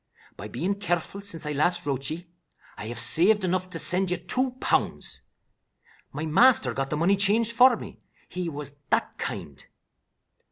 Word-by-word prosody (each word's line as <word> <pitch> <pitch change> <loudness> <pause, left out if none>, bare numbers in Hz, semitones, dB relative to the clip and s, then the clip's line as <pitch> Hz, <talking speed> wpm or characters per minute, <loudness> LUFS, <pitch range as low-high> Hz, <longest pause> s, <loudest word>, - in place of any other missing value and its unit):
By 105 - -8
bein' 180 - -3
careful 195 0 -2
since 185 -6 -1
I 150 - -2
last 175 +5 +1
wrote 135 -1 -2
ye, 170 +3 -6 0.5
I 105 - -7
have 120 - -6
saved 205 +5 +3
enough 185 0 -1
to - - -3
send 185 +1 +1
you 180 - 0
two 255 +9 -1
pounds. - - -1 0.9
My 150 +3 -4
master 160 - +4
got 135 +2 -2
the 150 - -2
money 175 +5 +3
changed 215 +4 +2
for 250 0 +7
me, - - -10 0.3
he 180 -1 -4
was 145 -2 -7 0.2
that - - 0
kind. - - -5
175 Hz, 165 wpm, -26 LUFS, 150-200 Hz, 0.9 s, for